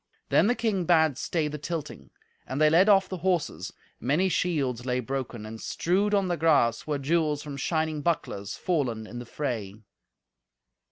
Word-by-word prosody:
Then - - +4
the 245 - +2
king 215 -6 0
bade 160 -5 +3
stay 160 -3 -1
the 150 0 -5
tilting. 155 -1 -5 0.4
And 130 - -3
they 155 0 +5
led 185 +6 +5
off 195 -2 +5
the 185 - -5
horses. 180 -2 -1 0.3
Many 155 +9 +1
shields 145 -9 0
lay 125 0 0
broken, 125 -3 -4
and, 110 +1 -8
strewed 200 +4 +1
on 195 -2 +2
the 175 -1 -1
grass, 150 -8 +2
were 150 -1 0
jewels 150 +1 0
from 145 -2 -6
shining 155 +2 -1
bucklers, 125 - -2
fallen 130 -11 -1
in 120 +3 -8
the 120 - -8
fray. 115 -9 -3
155 Hz, 170 wpm, -27 LUFS, 130-175 Hz, 0.4 s, they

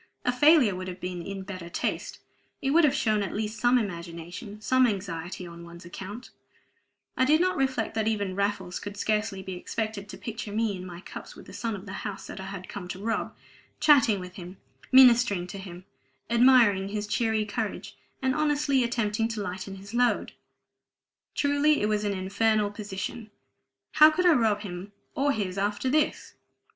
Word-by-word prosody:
A 245 - +3
failure 270 - +5
would 185 0 -5
have 185 0 -6
been 180 -1 -4
in 195 +2 -6
better 185 -3 -7
taste; - - -3 0.4
it 270 - -1
would 335 +3 +5
have 285 -1 +2
shown 215 -7 +1
at 200 - -3
least 215 +1 -3
some 245 +2 +4
imagination, 175 +1 -5
some 255 +4 +3
anxiety 180 -3 -4
on 170 0 -10
one's 170 0 -12
account 200 +7 -8 0.8
I 260 - +2
did 300 +4 +4
not 370 +1 +2
reflect 265 -5 0
that 220 -1 0
even 205 -4 -1
Raffles 200 -2 -1
could 205 0 -7
scarcely 210 -2 -1
be 190 - -6
expected 210 +2 -4
to - - -8
picture 220 -2 -6
me 215 -1 0
in 185 0 -7
my 175 0 -9
cups - - -9
with - - -13
the - - -12
son 230 -2 -3
of 195 0 -9
the 195 - -7
house 195 - -5
that - - -8
I 190 - -6
had 195 -2 -7
come 200 -4 -7
to 180 - -5
rob; 225 +3 -2 0.4
chatting 250 -9 +5
with 180 0 -9
him, 180 0 -9 0.3
ministering 240 -8 +6
to 190 +2 -8
him; 185 -1 -10 0.5
admiring 235 -5 +5
his 210 +1 -3
cheery 215 +1 0
courage, 210 0 -4 0.3
and 260 0 +2
honestly 295 -3 +2
attempting 225 -2 0
to 225 -2 -4
lighten 190 +1 -5
his 200 +2 -11
load! 245 0 +2 1.0
Truly 285 +1 +3
it 210 - +1
was 210 -1 0
an 205 - 0
infernal 205 +2 +1
position: 205 +2 -6 0.6
how 305 0 +8
could 360 +4 0
I 350 - +7
rob 220 -6 +2
him 190 0 -7 0.2
or 285 +1 +1
his 195 -6 -2
after 205 +6 0
this? 305 +1 0
210 Hz, 185 wpm, -27 LUFS, 190-240 Hz, 1.0 s, how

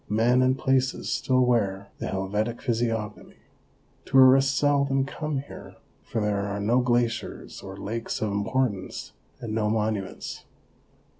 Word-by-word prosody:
Men 115 +4 +3
and 130 +1 +3
places 130 0 0
still 130 -1 +2
wear 100 -5 0
the - - -3
Helvetic 105 +5 -2
physiognomy. 115 -3 -2 0.7
Tourists 135 +1 +5
seldom 140 -2 +2
come 145 0 -3
here, 140 - -11 0.3
for 115 - -4
there 105 -1 0
are 100 0 -3
no 115 +5 +2
glaciers 120 -2 -1
or 95 0 -9
lakes 115 +3 -4
of 110 -1 -1
importance, 100 -1 -2 0.3
and 115 -2 -5
no 110 -1 +1
monuments. 105 -3 -3
115 Hz, 130 wpm, -26 LUFS, 105-130 Hz, 0.7 s, Tourists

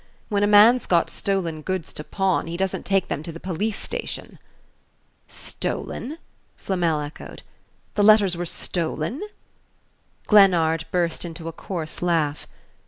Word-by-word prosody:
When 205 -1 +1
a 205 - +3
man's 215 +4 +6
got 170 -2 +2
stolen 175 -6 -1
goods 185 0 -3
to 150 - -6
pawn 190 0 0
he 170 +1 -4
doesn't 190 0 -2
take 195 -2 +2
them 145 - -3
to 165 - -7
the 165 - -9
police 195 +5 -2
station." - - -6 0.9
"Stolen?" 290 +7 -4 0.4
Flamel 170 -5 0
echoed. 145 +1 -9 0.5
"The 205 - +1
letters 205 -4 +6
were 175 0 -3
stolen?" 165 - -2 1.0
Glennard 170 -6 +5
burst 170 -2 0
into 165 -1 -7
a - - -3
coarse 165 -2 -5
laugh. 160 -4 0
175 Hz, 135 wpm, -23 LUFS, 165-200 Hz, 1.0 s, man's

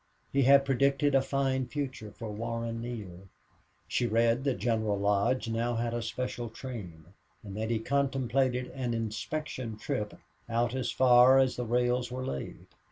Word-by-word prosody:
He 140 - +3
had 140 +1 +6
predicted 140 +2 +2
a 135 - +5
fine 135 -1 0
future 130 -6 -4
for 110 +1 -7
Warren 115 +1 -3
Neale. 100 -6 -7 0.6
She 120 - 0
read 115 +3 +2
that 135 -3 +1
General 110 0 0
Lodge 100 +5 +1
now 115 +1 -1
had 115 0 -1
a 120 - -1
special 120 +1 -4
train 105 - -8 0.4
and 100 -2 -8
that 110 +1 -2
he 115 - +1
contemplated 130 0 0
an 125 -3 -2
inspection 115 +1 -4
trip 105 0 -3 0.3
out 120 +1 +1
as 130 -2 -1
far 125 +2 +6
as 130 -1 +3
the 125 - -3
rails 125 +1 +1
were 130 +1 -4
laid. 70 - -5
120 Hz, 160 wpm, -30 LUFS, 115-130 Hz, 0.6 s, had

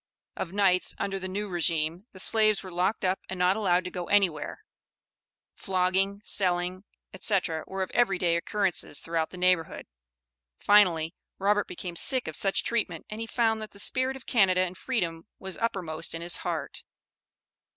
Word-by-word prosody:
Of 175 - -4
nights, 190 -2 +2
under 195 -1 -2
the 185 - -5
new 205 +3 -3
regime, 170 +1 -1
the 185 - -12
slaves 215 +1 +3
were 185 - -9
locked 185 +4 0
up 185 +1 +1
and 190 - -5
not 180 +1 +3
allowed 185 -4 +2
to 180 - -5
go 180 -1 -4
anywhere; 195 - +1 0.9
flogging, 190 +2 0
selling, 180 0 +1 0.3
etc., 185 -5 0
were 190 0 -2
of - - -7
every 235 -6 +2
day 175 -2 +1
occurrence 185 0 0 0.2
throughout 165 -1 -2
the 180 - -10
neighborhood. 180 -2 +1 0.7
Finally, 175 -6 +4 0.2
Robert 205 +1 +2
became 180 -1 -6
sick 255 +8 +1
of 160 - -4
such 195 +4 +1
treatment, 205 -8 -2
and 215 +1 -5
he 225 - -4
found 225 -2 +1
that 215 - -8
the 200 - -11
spirit 255 +5 +1
of 265 - -11
Canada 190 -5 +3
and 185 0 -2
freedom 175 -9 -2
was 190 -1 -5
uppermost 180 -9 -2
in 165 - -5
his 170 0 +4
heart. - - -4
185 Hz, 170 wpm, -28 LUFS, 175-205 Hz, 0.9 s, Finally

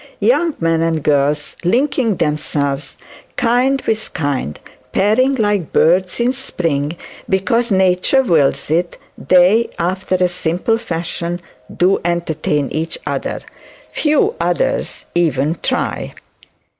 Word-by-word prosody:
Young 345 - +2
men 165 -1 +1
and 165 -2 0
girls 145 0 +1
linking 240 +2 +1
themselves 145 -3 -2 0.4
kind 250 +3 +2
with 220 -1 -1
kind, 140 - -2 0.3
pairing 255 +7 +3
like 205 - 0
birds 180 +5 +2
in 240 +2 +2
spring, 165 - -2 0.3
because 215 +6 +1
nature 190 +7 +3
wills 155 - +2
it, 170 +2 0 0.2
they, 185 +6 +4
after 185 +2 -1
a 180 0 +2
simple 180 +5 -1
fashion, 175 -3 -3 0.4
do 185 +2 +3
entertain 160 -4 -1
each 160 +2 -2
other. - - -3 0.5
Few 310 +8 +2
others - - -1
even 160 -2 +1
try. - - -2
180 Hz, 110 wpm, -17 LUFS, 160-230 Hz, 0.5 s, they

